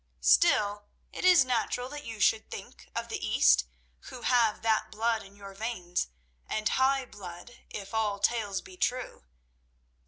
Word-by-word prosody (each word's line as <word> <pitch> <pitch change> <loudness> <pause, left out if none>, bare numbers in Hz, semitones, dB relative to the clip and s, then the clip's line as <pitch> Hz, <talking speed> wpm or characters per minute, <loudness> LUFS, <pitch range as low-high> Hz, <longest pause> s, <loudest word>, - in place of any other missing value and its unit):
"Still, 205 - +3 0.3
it - - -6
is 360 -7 +7
natural 250 0 -1
that 295 +1 -7
you 225 -2 -7
should 220 +1 +2
think - - -10
of - - -3
the - - -5
East - - +4 0.4
who 240 - -9
have 235 -4 +2
that 220 -1 +1
blood 225 0 0
in 195 +1 -14
your 200 -1 -11
veins, 195 - -3 0.4
and 215 0 -1
high 265 0 +2
blood, 190 +1 -11
if 200 0 -8
all 215 -2 0
tales 205 -2 0
be 375 - -13
true. 250 - -2
220 Hz, 155 wpm, -29 LUFS, 195-245 Hz, 0.4 s, is